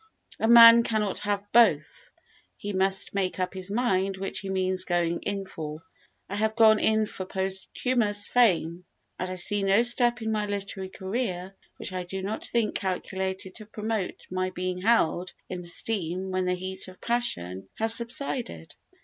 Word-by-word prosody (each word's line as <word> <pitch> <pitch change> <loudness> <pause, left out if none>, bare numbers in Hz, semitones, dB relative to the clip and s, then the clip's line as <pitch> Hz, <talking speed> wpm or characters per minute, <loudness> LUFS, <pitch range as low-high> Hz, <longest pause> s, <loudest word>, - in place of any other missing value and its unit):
A 225 - +1
man 230 0 +10
cannot 215 -4 -1
have 205 -1 -1
both, 485 - +3 0.5
he 205 0 -5
must 190 0 0
make 190 -2 -1
up 185 - -1
his 185 0 -4
mind 195 -4 0
which 195 -1 -4
he 195 +2 -6
means 185 -1 0
going 170 -2 0
in 200 -1 -3
for. 155 -3 -7 0.4
I 200 - -4
have 220 +1 0
gone 220 -2 +6
in 220 0 +2
for 190 - -6
posthumous 205 +3 -1
fame 180 -7 +2 0.3
and 185 - -3
I 185 - -4
see 200 +3 -1
no 195 +4 +4
step 240 -1 +3
in 220 - -1
my 210 -1 -1
literary 195 -1 -4
career 190 -2 -4 0.2
which - - -5
I 185 - -2
do 190 +2 -6
not 210 +3 -2
think 230 -3 0
calculated 190 0 -3
to 215 -2 -8
promote 215 -2 -3
my 185 0 -1
being 185 0 -4
held 185 -4 +2
in 180 - -4
esteem 180 0 -3
when 185 0 0
the 180 0 +1
heat 190 +1 -4
of 185 0 -13
passion 95 - -1
has 225 +1 +2
subsided." 235 - -3
195 Hz, 165 wpm, -27 LUFS, 185-220 Hz, 0.5 s, man